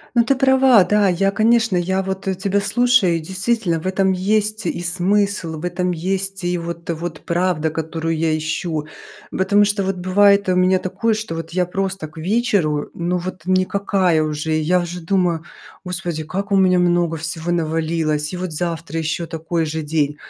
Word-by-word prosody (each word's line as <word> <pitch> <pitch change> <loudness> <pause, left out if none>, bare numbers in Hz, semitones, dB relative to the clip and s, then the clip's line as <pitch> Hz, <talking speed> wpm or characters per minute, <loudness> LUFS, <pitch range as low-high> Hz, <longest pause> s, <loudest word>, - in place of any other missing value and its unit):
Ну, 235 -1 +5
ты 275 +3 +2
права. 265 -5 +5
Да, 210 0 +3
я, 190 +2 +2
конечно, 225 0 +2
я 190 +2 0
вот, 190 0 -5
э, 190 - +1
тебя 195 +2 0
слушаю 235 -3 +3
и - - -1
действительно 190 +1 -1
в 175 - -8
этом 190 0 +2
есть 210 +3 0
и - - -2
смысл, 185 -1 0
в - - -9
этом 180 +1 -1
есть 190 +2 -3
и 175 0 0
вот 170 0 -6
вот 165 -1 -4
правда, 170 -2 0
которую 160 +1 -3
я 155 0 +1
ищу. 155 0 -3 0.4
Потому 200 +2 +3
что 205 0 0
вот 190 0 -1
бывает 200 +2 +3
у 185 - +3
меня 185 +1 +3
такое, 195 +5 -1
что 215 -6 -4
вот 165 0 -6
я 180 +1 0
просто 190 -2 -3
к 155 - -21
вечеру, 175 -4 0
ну 175 +1 -1
вот, 185 -1 -6
никакая 185 -2 +1
уже. 155 +1 -2
Я 155 +4 +2
уже 175 0 -5
думаю: 175 -2 0 0.4
"Господи, 175 -3 -4
как 200 +5 -4
у - - +4
меня 185 -1 +4
много 175 -2 +2
всего 160 +1 -4
навалилось, 160 -2 -1
и 180 - -4
вот 180 -2 -4
завтра 165 -1 -3
еще 160 +1 -2
такой 165 0 -2
же 160 +1 -3
день". 150 -1 -1
180 Hz, 185 wpm, -20 LUFS, 165-195 Hz, 0.4 s, Ну